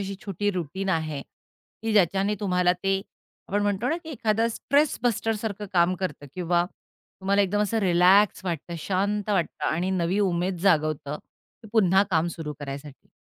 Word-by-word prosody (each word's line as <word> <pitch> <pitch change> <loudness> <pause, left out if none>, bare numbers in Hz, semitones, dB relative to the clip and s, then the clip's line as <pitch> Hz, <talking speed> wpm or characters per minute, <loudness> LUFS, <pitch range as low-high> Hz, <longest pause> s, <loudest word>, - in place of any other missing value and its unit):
अशी 195 0 -4
छोटी 205 +1 -1
रुटीन 190 +1 -4
आहे? 155 -5 -1 0.6
की 225 -1 -1
ज्याच्याने 195 +1 +3
तुम्हाला 180 -2 +2
ते 195 0 +1 0.5
आपण 205 +1 0
म्हणतो 205 +4 0
ना 325 - +1
की 320 - -7
एखादा 225 -4 +1
स्ट्रेस 280 +6 +1
बस्टर 225 -2 +1
सारखं 210 -1 -4
काम 175 0 +3
करतं 150 -6 -4
किंवा 175 -1 +1 0.6
तुम्हाला 200 +1 +3
एकदम 205 +2 0
असं 220 +2 0
रिलॅक्स 185 +2 +4
वाटतं, 170 -1 -4
शांत 205 +4 -1
वाटतं 185 -5 -1
आणि 175 +4 0
नवी 185 +1 0
उमेद 180 -1 0
जागवतं 155 -5 +1
की 220 -4 -21
पुन्हा 195 -3 +5
काम 165 -1 +2
सुरू 150 -2 -5
करायसाठी? 140 0 -8
190 Hz, 160 wpm, -26 LUFS, 170-205 Hz, 0.6 s, पुन्हा